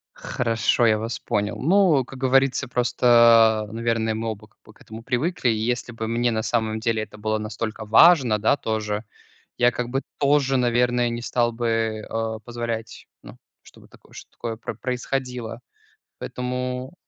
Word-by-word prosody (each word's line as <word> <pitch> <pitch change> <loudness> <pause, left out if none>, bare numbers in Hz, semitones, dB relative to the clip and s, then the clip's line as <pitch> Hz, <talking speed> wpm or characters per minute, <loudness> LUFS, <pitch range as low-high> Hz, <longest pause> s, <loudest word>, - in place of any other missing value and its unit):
Хорошо, 115 0 0
я 110 -1 +3
вас 115 +2 -4
понял. 105 0 -2
Ну, 170 -3 +4
как 135 - -12
говорится, 135 0 +2
просто, 115 -3 +4
наверное, 115 -1 -1
мы 115 +1 -3
оба 110 0 -7
как - - -37
бы 110 - -17
к - - -25
этому 110 +1 -11
привыкли. 135 +4 0
Если 120 +2 -1
бы 115 -1 -5
мне 120 +1 0
на 110 -1 -1
самом 110 -1 -1
деле 110 -1 -1
это 105 - -12
было 110 +1 -1
настолько 110 +1 -5
важно, 120 -1 +5
да 110 +7 +2
тоже, 110 -2 -3 0.5
я 120 0 +4
как 125 0 -4
бы 135 +2 -1 0.2
тоже, 140 -2 +2
наверное, 120 0 +1
не 120 0 -4
стал 120 0 0
бы, 120 0 -3 0.4
э, 110 0 -3
позволять, 115 -1 -5 0.2
ну, - - -12 0.2
чтобы - - -18
так - - -20
чтобы - - -12 0.3
такое 115 - -6
происходило. 125 -2 -4 0.6
Поэтому 125 +2 -4
120 Hz, 160 wpm, -23 LUFS, 110-125 Hz, 0.6 s, важно